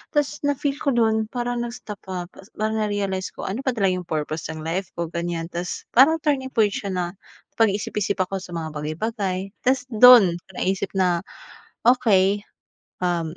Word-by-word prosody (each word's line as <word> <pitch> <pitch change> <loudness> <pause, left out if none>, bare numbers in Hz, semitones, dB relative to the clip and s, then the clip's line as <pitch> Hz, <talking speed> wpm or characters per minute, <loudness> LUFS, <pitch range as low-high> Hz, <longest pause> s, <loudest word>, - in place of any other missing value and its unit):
Tapos 295 0 +1
na 285 - +2
feel 280 0 -1
ko - - +1
do'n 220 -2 +2
parang 245 0 -2
nag-stop, 235 -3 -6
ah, 180 -1 -3 0.3
parang 220 +1 -1
na-realize 200 -3 -1
ko - - -7
ano 200 +6 -3
ba - - +3
talaga 195 -4 +2
'yung 180 - -10
purpose 155 0 -3
ng 155 -1 -8
life 180 +3 -2
ko, 170 -1 -3
ganiyan. 170 -1 -2
Tapos 175 +1 -4
parang 275 +6 +6
turning 275 -4 0
point 215 -3 +4
siya, 200 0 -4
napag-isip-isip 200 +3 -2
ako 190 +1 -2
sa 180 -2 -9
mga 160 -1 -3
bagay-bagay 185 +5 -3
tapos 255 0 +3
do'n 220 -6 +8 0.2
naisip 190 +2 -1
na 180 -2 +2 0.7
okey, 205 -5 +3 0.6
um, 170 -2 -1
195 Hz, 160 wpm, -23 LUFS, 175-230 Hz, 0.7 s, do'n